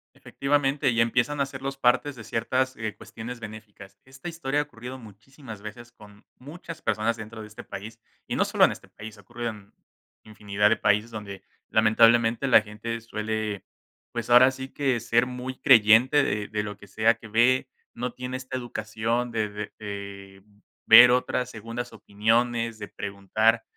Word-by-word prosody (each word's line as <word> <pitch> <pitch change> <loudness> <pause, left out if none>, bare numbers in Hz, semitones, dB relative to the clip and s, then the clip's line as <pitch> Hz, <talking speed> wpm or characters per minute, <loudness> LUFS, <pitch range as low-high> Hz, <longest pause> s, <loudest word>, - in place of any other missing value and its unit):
efectivamente, 140 0 0
y 115 -1 +2
empiezan 125 +5 +1
a 140 - +2
ser 135 -1 -9
los 135 0 -4
partes 135 +2 +2
de 115 - -10
ciertas, 130 +4 -1
eh, 110 -1 -4
cuestiones 120 +2 -9
benéficas. 105 -3 -11
Esta 130 +4 -11
historia 145 -4 -2
ha - - +1
ocurrido 125 -2 -9
muchísimas 110 +1 -12
veces 120 +3 -10
con 105 -2 -17
muchas 160 +4 -10
personas 110 +2 0
dentro 110 0 -9
de 105 - -9
este 105 - -11
país, 110 +3 -9 0.3
y - - -3
no - - +3
solo - - +4
en - - +1
este - - -10
país, 110 +1 -11
ocurrió 120 +2 -5
en 105 -2 -11 0.5
infinidad 105 -1 0
de 115 - +2
países 105 +2 +1
donde, 100 -3 -8 0.3
lamentablemente, 115 +3 +4
la 120 - +7
gente 110 +2 -6
suele, 110 -2 -4 0.5
pues 120 -1 -5
ahora 125 +2 +8
sí 130 0 -8
que 135 -4 0
ser 120 +1 +1
muy 125 +1 -6
creyente 125 +3 +6
de 105 -1 -2
de 105 -1 -2
lo 105 -1 -6
que 100 +1 -16
sea 110 +3 +2
que 115 0 -14
ve, 125 +4 +2 0.2
no 120 +1 -4
tiene 125 0 -5
esta 130 0 -6
educación 115 0 -3
de 110 -2 -1
de 105 0 -7
de 100 -2 -8 0.4
ver 120 +2 +10
otras 125 0 0
segundas 115 +2 -7
opiniones, 115 +2 0
de 100 - -6
preguntar 110 +3 0
115 Hz, 170 wpm, -26 LUFS, 105-125 Hz, 0.5 s, ver